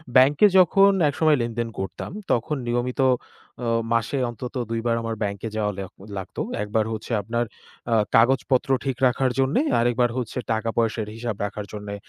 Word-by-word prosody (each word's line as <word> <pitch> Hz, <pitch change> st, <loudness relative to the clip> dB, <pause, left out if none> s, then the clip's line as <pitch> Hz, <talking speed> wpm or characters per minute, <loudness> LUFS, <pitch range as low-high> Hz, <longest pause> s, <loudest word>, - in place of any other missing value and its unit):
bank-এ 140 Hz, +10 st, +6 dB
যখন 195 Hz, +3 st, +6 dB, 0.2 s
একসময় 155 Hz, 0 st, +3 dB
লেনদেন 115 Hz, 0 st, -2 dB
করতাম 95 Hz, -, -5 dB, 0.2 s
তখন 150 Hz, +6 st, +1 dB
নিয়মিত 120 Hz, +2 st, -1 dB, 0.6 s
অ -, -, -1 dB, 0.3 s
মাসে 115 Hz, +4 st, 0 dB
অন্তত 125 Hz, +3 st, -7 dB
২ 115 Hz, 0 st, -1 dB
বার 115 Hz, -, +2 dB
আমার 115 Hz, 0 st, -3 dB
bank-এ 100 Hz, +2 st, -3 dB
যাওয়া 105 Hz, -1 st, 0 dB
লেওয়া 95 Hz, 0 st, -6 dB, 0.3 s
লাগত। 95 Hz, +2 st, -8 dB, 0.3 s
একবার 105 Hz, +1 st, 0 dB
হচ্ছে 110 Hz, +2 st, -7 dB
আপনার 120 Hz, +4 st, -1 dB, 0.5 s
আ -, -, +5 dB, 0.2 s
কাগজপত্র 130 Hz, +3 st, +3 dB, 0.2 s
ঠিক 130 Hz, -2 st, -1 dB
রাখার 130 Hz, +1 st, +1 dB
জন্যে, 135 Hz, -, +2 dB, 0.2 s
আরেকবার 120 Hz, 0 st, +2 dB
হচ্ছে 125 Hz, 0 st, -4 dB, 0.2 s
টাকা 110 Hz, +1 st, -1 dB
পয়সার 115 Hz, -2 st, 0 dB
হিসাব 115 Hz, -2 st, -3 dB
রাখার 105 Hz, 0 st, -5 dB
জন্যে, 105 Hz, -1 st, -6 dB
120 Hz, 160 wpm, -24 LUFS, 110-130 Hz, 0.6 s, bank-এ